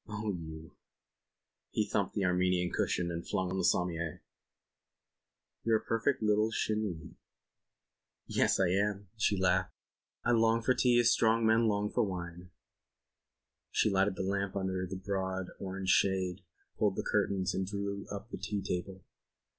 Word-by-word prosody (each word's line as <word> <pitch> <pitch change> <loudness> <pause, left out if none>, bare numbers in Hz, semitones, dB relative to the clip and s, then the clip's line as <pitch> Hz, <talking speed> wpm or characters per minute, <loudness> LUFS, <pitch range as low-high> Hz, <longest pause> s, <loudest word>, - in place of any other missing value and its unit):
"Oh, 105 -1 -3
you." 80 -3 -7 1.0
He - - 0
thumped - - -1
the 100 - +1
Armenian 90 0 +2
cushion 85 -1 0
and 85 0 -4
flung 95 -1 -1
on - - -3
to - - -2
the - - 0
sommier. 85 -3 0 1.4
"You're 115 -1 +3
a - - -10
perfect 115 +2 0
little 105 +1 +3
Chinee." 105 -7 -2 1.1
"Yes, - - +2
I 95 -2 +3
am," 100 +1 0
she 105 -2 +1
laughed. 90 0 +1 0.5
"I - - +3
long 115 0 +3
for 130 - +4
tea 125 -1 +4
as 120 0 +5
strong 115 0 +3
men 110 +1 +4
long 105 0 0
for 120 - +1
wine." 90 -2 -5 1.2
She 110 - +2
lighted 95 0 +2
the - - -3
lamp 100 0 -1
under 95 -1 -1
its 95 +1 -4
broad 95 -1 -3
orange 95 0 -4
shade, 95 -1 +2 0.4
pulled - - +2
the - - -2
curtains 95 -1 0
and 95 -1 -1
drew 100 0 -4
up 100 +2 -7
the - - -5
tea 100 -2 -3
table. 95 +1 -4
95 Hz, 155 wpm, -32 LUFS, 90-105 Hz, 1.4 s, as